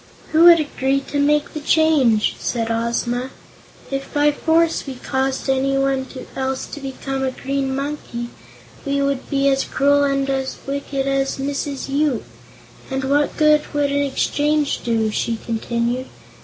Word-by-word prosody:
"Who 320 +2 +6
would 340 -1 +9
agree 275 -2 0
to 285 +1 -4
make 295 +1 +2
the 305 - -4
change?" 295 -8 +3
asked 230 -2 -2
Ozma. 235 +2 -1 0.6
"If 275 0 -4
by 295 0 +3
force 325 +1 +1
we 270 - -5
caused 265 +2 -2
anyone 270 0 +1 0.3
else 265 0 -2
to - - -8
become 270 0 -4
a 265 - +1
Green 270 0 -2
Monkey, 275 -4 -4 0.5
we 280 -1 -1
would 280 -1 -1
be 275 -1 +1
as 270 0 +3
cruel 285 +1 +2
and 275 -1 +1 0.4
wicked 275 0 -3
as 275 0 0
Mrs. 280 0 -3
Yoop. 280 -3 0 0.7
And 265 0 -2
what 285 +2 +1
good 305 -1 +5
would 285 -1 +1
an 285 0 +1
exchange 290 +1 0
do?" 225 -2 +1
she 230 +2 -1
continued. 235 +2 -2
275 Hz, 145 wpm, -20 LUFS, 265-285 Hz, 0.7 s, would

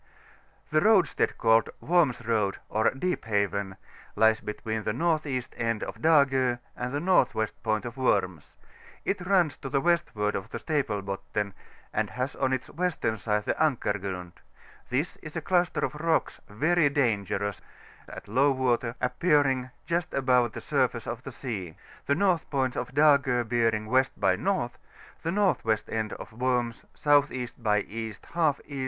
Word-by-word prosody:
The 155 0 +3
roadstead 205 -5 +3
called 115 0 +4
Worms 155 -9 +2
Road, 105 -4 +1
or 110 +1 +2
Deep 180 +4 -2
Haven, 100 -2 -1 0.4
lies 110 +1 +4
between 110 +1 -4
the - - -3
N.E. 145 0 0
end 115 -2 -1
of - - -7
Dago 135 -6 +4 0.2
and 125 0 -4
the - - -3
N.W. 150 -9 +2
pomt 110 0 -1
of 120 +2 -7
Worms; 95 - 0 0.5
it 195 -1 -1
runs 175 -5 +2
m - - -22
to 135 - -5
the 135 +1 +1
westward 155 -11 +1
of 100 +3 -4
the - - -5
Staple 130 -10 -1
Botten, 100 +1 -3 0.4
and 110 -1 0
has 125 +2 -3
on 130 -1 0
its 130 -1 -2
western 170 -9 -1
side 105 -1 -1
the - - +1
Ankar 140 -9 +2
Chround: 90 -3 -5 0.6
this 140 +7 -1
is 155 0 -10
a - - 0
cluster 175 +1 +1
of - - -1
rocks 160 +2 0
very 155 +8 +2
dangerous, 105 -7 0 0.5
at - - -9
low 130 +7 +3
water, 125 -3 0
appearing 130 -1 +2 0.2
just 170 0 -1
above 125 -4 +3
the - - -6
surface - - 0
of - - -5
the - - -8
sea, 95 -10 -5 0.3
the 140 - +3
north 180 -1 +1
point 130 -3 0
^Dago 135 -2 +3
bearing 115 -2 +1
W. 130 +4 +4
by 95 - +3
N.; 95 - -5 0.8
the 165 - -2
N.W. 175 - +2
end 110 -1 -2
of - - -9
Worms 120 -1 -1 0.2
S.E. 145 -4 +3
by 105 -3 +2
E. 110 +1 -5 0.2
J 165 -4 +3
E. 140 -2 -6
125 Hz, 160 wpm, -27 LUFS, 110-150 Hz, 0.8 s, called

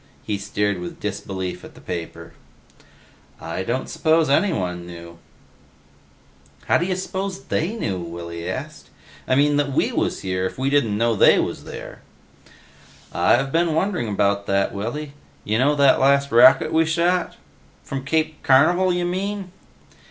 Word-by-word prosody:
He 105 -2 -3
stared 100 -1 -1
with 90 0 -7
disbelief 95 -2 -5
at - - -13
the - - -14
paper. 85 -2 -7 1.1
"I - - -5
don't 120 +7 -2
suppose 160 -2 +2
anyone 90 - 0
knew." 85 -1 -11 1.5
"How - - +3
d'ya 185 +2 -1
suppose 190 +1 -4
they 180 +8 -2
knew?" 100 - -3
Willy 85 0 -6
asked. - - -7 0.4
"I 130 - +2
mean, 145 +1 +3
that 145 -1 0
we - - +1
was - - -1
here, 95 0 -1
if - - -10
we 135 +1 -1
didn't 115 -8 +2
know 115 +1 +1
they - - +6
was - - -2
there?" - - -9 1.1
"I've 135 +2 +2
been 165 0 +1
wondering 180 - 0
about 100 -1 0
that, 100 0 +1
Willy. 140 +9 -5 0.3
You 110 +2 0
know 145 +3 +3
that 140 -2 +4
last 140 +1 +3
rocket 120 +8 +6
we 160 0 +4
shot?" 175 +2 0 0.5
"From 135 -1 -5
Cape 155 +2 -1
Carnival 175 +8 +4
you 175 0 -1
mean?" 190 +1 -3
135 Hz, 150 wpm, -22 LUFS, 100-160 Hz, 1.5 s, they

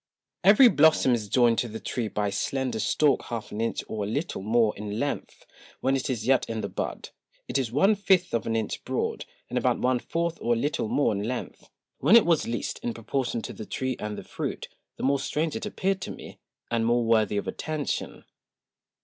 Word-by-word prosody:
Every 205 +7 +8
Blossom 155 - +5
is 110 -3 -2
joined 120 -1 +4
to 120 - 0
the 110 0 -7
Tree 120 -3 -3
by 105 -1 -1
a - - -5
slender 125 +3 -2
Stalk 140 +6 +2
half 115 -3 -5
an 105 - -3
Inch 115 - -1
or 110 -2 -3
a - - -3
little 140 - -3
more 110 +1 +2
in 105 +1 -5
length; 145 +2 -4 0.3
when 135 +1 +1
it 135 - -2
is 115 -4 -2
yet 130 0 +2
in 110 -1 -2
the 100 - -2
Bud, - - -4 0.4
it - - 0
is 125 -4 -2
one 195 - +4
Fifth 190 -3 +2
of 115 - -1
an 115 - 0
Inch 110 -2 -2
broad, - - -2 0.2
and - - -1
about - - +1
one 125 0 +1
fourth 170 +4 -2
or 120 - +2
a - - -1
little 145 0 -1
more 140 -1 +2
in 100 - -2
length: 125 +1 -5 0.3
when 220 - +5
it 235 - +7
was 165 -3 +2
least, 120 0 -3
in 120 - -3
proportion 120 0 -2
to - - -6
the 110 - -8
Tree 130 -1 -2
and 105 -1 -4
the - - -7
Fruit, - - -5 0.3
the - - -6
more 140 +1 +2
strange 155 +3 -1
it - - -3
appeared 195 -2 -1
to - - -5
me, - - -10 0.3
and 115 -1 +1
more 120 +1 +2
worthy 110 -2 +2
of 100 - -2
Attention[a]. 155 -2 -3
120 Hz, 220 wpm, -27 LUFS, 110-145 Hz, 0.4 s, Every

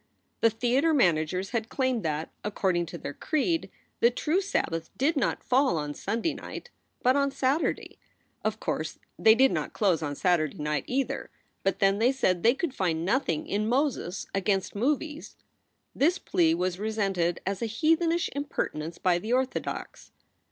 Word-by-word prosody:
The 230 - +5
theater 250 +8 +2
managers 180 - +2
had 230 -1 -2
claimed 260 -3 0
that, 155 -2 -2
according 185 -4 0
to 170 - -7
their 145 - -6
creed, 325 - 0 0.3
the 235 - +6
true 310 +9 0
Sabbath 165 - -2
did 300 +5 +2
not 275 - 0
fall 260 - +3
on 150 -1 -3
Sunday 230 - -2
night, 485 - -8 0.3
but 255 +2 +4
on 280 0 +2
Saturday. 275 +3 -1 0.4
Of - - -1
course - - -3 0.2
they 220 0 +7
did 265 +2 +5
not - - -2
close 190 -7 +2
on 145 -2 -3
Saturday 165 -3 +1
night, 150 -2 -2
either; 265 +1 -2 0.3
but 195 - 0
then, 195 +1 +3
they 240 +3 +4
said, 185 -10 +1
they 235 +6 +4
could 305 -1 -2
find 170 -7 -1
nothing 195 - 0
in 215 +2 -1
Moses 250 - 0
against 195 0 0
movies. 295 +7 -2 0.6
This 335 +7 +2
plea 165 - +2
was 180 +1 -1
resented 195 -5 0
as 195 0 -2
a 230 - 0
heathenish 325 +8 +2
impertinence 170 - -3
by 180 -2 +2
the 215 +6 -5
orthodox. 260 +1 -3
220 Hz, 160 wpm, -28 LUFS, 175-275 Hz, 0.6 s, they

